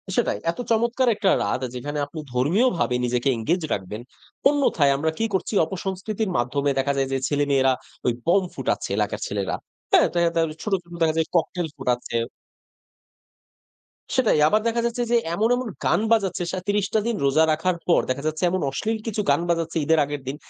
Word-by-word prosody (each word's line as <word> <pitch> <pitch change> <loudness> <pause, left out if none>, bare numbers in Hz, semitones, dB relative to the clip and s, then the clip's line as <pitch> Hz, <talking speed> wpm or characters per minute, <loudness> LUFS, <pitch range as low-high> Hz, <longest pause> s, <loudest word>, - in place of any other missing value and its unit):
সেটাই, - - +1
এত 170 - -14
চমৎকার 235 +3 +2
একটা 200 -2 +1
রাত 100 +5 -1
যেখানে 145 +4 -4
আপনি 150 +3 -9
ধর্মীয় 165 - +3
ভাবে 125 -6 +1
নিজেকে 125 +2 0
এনগেজ 170 +11 0
রাখবেন। 100 +3 -5 0.5
অন্যথায় 275 - +3
আমরা 160 +3 0
কি 225 - 0
করছি 190 +3 -1
অপসংস্কৃতির 190 +4 -3
মাধ্যমে 140 +4 0
দেখা 140 +1 +1
যায় 135 -1 +1
যে, 135 - +1
ছেলেমেয়েরা 140 -2 +2 0.3
ওই 125 - +4
বোম 190 +3 +4
ফুটাচ্ছে - - -2
এলাকার - - -1
ছেলেরা। - - -2 0.4
হ্যাঁ? 375 -5 +6
দেখা 170 0 +2
যায় 170 - +1
তাহলে 165 -2 +1
ছোট, 210 - -2
ছোট 170 0 -15
দেখা 160 0 +2
যায় 160 - +1
ককটেইল 170 0 0
ফুটাচ্ছে। 125 -3 -1 2.0
সেটাই, 230 -11 +3
আবার 215 +7 +3
দেখা 235 +1 +1
যাচ্ছে 235 +1 -1
যে, 240 - +5 0.2
এমন, 215 +6 +1
এমন 250 -1 -3 0.2
গান - - +3
বাজাচ্ছে 200 -5 +2
সা 185 - -2
৩০ 205 -1 +1
টা 220 - +4
দিন 235 - 0
রোজা 140 +4 +4
রাখার 170 +3 0
পর। 170 - +4
দেখা 135 +3 -2
যাচ্ছে, 155 +3 -3
এমন 185 +1 -1
অশ্লীল 220 +11 -1
কিছু 215 -1 -1
গান - - +3
বাজাচ্ছে 165 -1 0
ঈদের 160 +1 +3
আগের 145 0 -5
দিন। 135 - -2
170 Hz, 185 wpm, -24 LUFS, 140-210 Hz, 2.0 s, হ্যাঁ